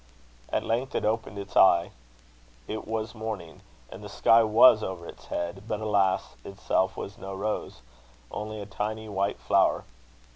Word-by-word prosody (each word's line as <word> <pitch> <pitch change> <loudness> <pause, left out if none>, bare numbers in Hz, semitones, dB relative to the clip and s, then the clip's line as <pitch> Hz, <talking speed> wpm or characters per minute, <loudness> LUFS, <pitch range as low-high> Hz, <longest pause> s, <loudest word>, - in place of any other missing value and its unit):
At - - 0
length 125 +4 -2
it - - 0
opened 110 -1 -1
its 100 -1 -8
eye. 85 -2 +5 0.8
It 110 - -5
was 110 0 -3
morning, 110 -7 -6 0.3
and - - -10
the - - -8
sky 115 +1 +5
was 110 0 +6
over 95 -4 -5
its - - -12
head; 85 +4 -4
but, 105 - -2
alas! 100 -3 +1
itself 95 -1 -1
was 100 +3 -7
no 95 -3 -6
rose 105 -6 -3 0.5
only 105 +1 -5
a 100 - -6
tiny 110 +2 -4
white 100 -1 -1
flower. - - +2
105 Hz, 155 wpm, -27 LUFS, 95-110 Hz, 0.8 s, was